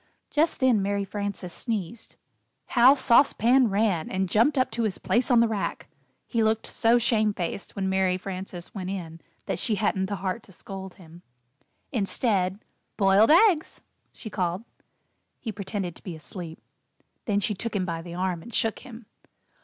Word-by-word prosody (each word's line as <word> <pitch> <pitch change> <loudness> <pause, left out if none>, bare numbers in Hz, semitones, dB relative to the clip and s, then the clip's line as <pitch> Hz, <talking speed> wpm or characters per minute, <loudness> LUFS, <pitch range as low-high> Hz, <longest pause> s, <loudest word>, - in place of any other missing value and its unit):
Just 315 +2 +1
then 255 -6 +3
Mary 200 0 -1
Frances 200 -3 -4
sneezed. 225 -1 -4 0.5
How 255 +3 +6
Sauce 260 0 +4
Pan 245 +2 +4
ran, 195 -5 +1
and 190 0 -1
jumped 235 +10 +3
up 255 - +2
to 230 +2 -2
his 215 -5 -1
place 245 +3 +1
on 240 -2 +5
the 235 - +4
rack! 215 -3 -3 0.4
He 230 - -1
looked 220 0 +1
so 230 +1 +2
shamefaced 215 -6 -1
when 195 -1 -1
Mary 190 -1 +1
Frances 185 -2 -7
went 185 -3 -5
in, 165 -4 -6 0.2
that - - -2
she 225 - +1
hadn't 195 -2 0
the 200 - -3
heart 190 +4 -3
to 200 - -19
scold 190 +1 -9
him. 170 -1 -15 0.7
Instead, 200 -4 0 0.3
"Boiled 195 +2 +5
Eggs," 340 -1 +4 0.3
she 220 - -10
called. 180 +1 -2 0.8
He 225 - -4
pretended 195 -3 -4
to - - -16
be 180 -4 -6
asleep. 165 +1 -9 0.7
Then 205 -2 +1
she 205 +1 0
took 220 +2 -5
him 190 -2 0
by 165 -2 -3
the 170 0 -8
arm 180 -2 -1
and 235 - -11
shook 225 -1 0
him. 240 -3 -12
200 Hz, 170 wpm, -26 LUFS, 185-230 Hz, 0.8 s, How